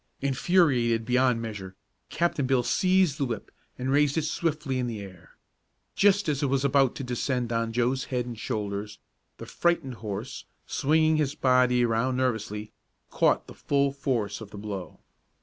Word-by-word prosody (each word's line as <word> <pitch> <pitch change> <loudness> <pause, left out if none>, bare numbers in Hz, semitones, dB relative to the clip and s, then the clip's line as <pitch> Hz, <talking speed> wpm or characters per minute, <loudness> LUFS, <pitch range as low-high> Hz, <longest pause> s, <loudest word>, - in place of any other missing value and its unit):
Infuriated 135 -5 +2
beyond 125 -1 +2
measure, 100 -4 -7 0.3
Captain 170 -6 0
Bill 130 -2 +2
seized 185 +3 +2
the 140 - +1
whip 115 -5 -5 0.3
and 130 +1 -2
raised 145 +1 +3
it 160 - +1
swiftly 150 -4 -1
in 125 - -1
the 115 -3 -4
air. 95 -4 -12 0.6
Just 200 -1 +3
as 145 -2 0
it 145 - +1
was 135 +1 0
about 135 -2 +3
to - - -5
descend 125 -1 -2
on 115 0 0
Joe's 125 +3 0
head 125 -2 -2
and 120 -1 -6
shoulders, 105 -2 -4 0.4
the - - -8
frightened 170 -6 0
horse, 110 +4 -5 0.2
swinging 155 +2 +2
his 150 -2 0
body 125 -1 +3
around 120 +3 0
nervously, 110 -4 -2 0.4
caught - - +2
the - - -11
full 140 -1 +1
force 120 -7 -2
of 110 - -9
the 105 - -10
blow. 100 -3 -7
125 Hz, 165 wpm, -27 LUFS, 115-140 Hz, 0.6 s, raised